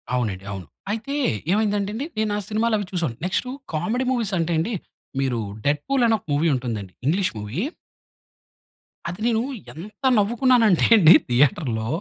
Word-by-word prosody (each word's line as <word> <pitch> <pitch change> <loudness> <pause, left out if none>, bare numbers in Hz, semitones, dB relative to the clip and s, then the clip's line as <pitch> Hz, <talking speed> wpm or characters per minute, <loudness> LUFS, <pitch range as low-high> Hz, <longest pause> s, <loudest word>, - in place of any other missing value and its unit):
అవునండి. 105 -6 -2
అవును. 95 -3 -6 0.3
అయితే, 225 +6 -3 0.4
ఏమైంది 210 +1 +2
అంటే 200 +1 -2
అండి. 265 +6 -3
నేను 215 -1 0
ఆ - - -1
సినిమాలు 220 +1 +1
అవి 205 - -3
చూసాను. 165 -10 -1
నెక్స్టు 200 +7 -1 0.2
కామెడీ 220 +11 -1
మూవీస్ 225 -6 -1
అంటే 165 +1 0
అండి. 190 +9 -1 0.5
మీరు 130 -3 0 0.3
'డెడ్‌ఫుల్' 150 - +1
అని 225 - +4
ఒక్క 185 - -21
మూవీ 155 +4 +2
వుంటుంది 125 -5 -2
అండి. 95 -2 -11
ఇంగ్షీషు 180 +2 +1
మూవీ... 105 - -4 1.5
అది 180 +4 -7
నేను 225 -2 +2 0.3
ఎంత 200 - -11
నవ్వుకున్నాను 235 +3 +3
అంటే 175 - +3
అండి 170 -3 +8 0.2
థియేటర్‌లో. 120 -3 +2
180 Hz, 160 wpm, -23 LUFS, 135-220 Hz, 1.5 s, అండి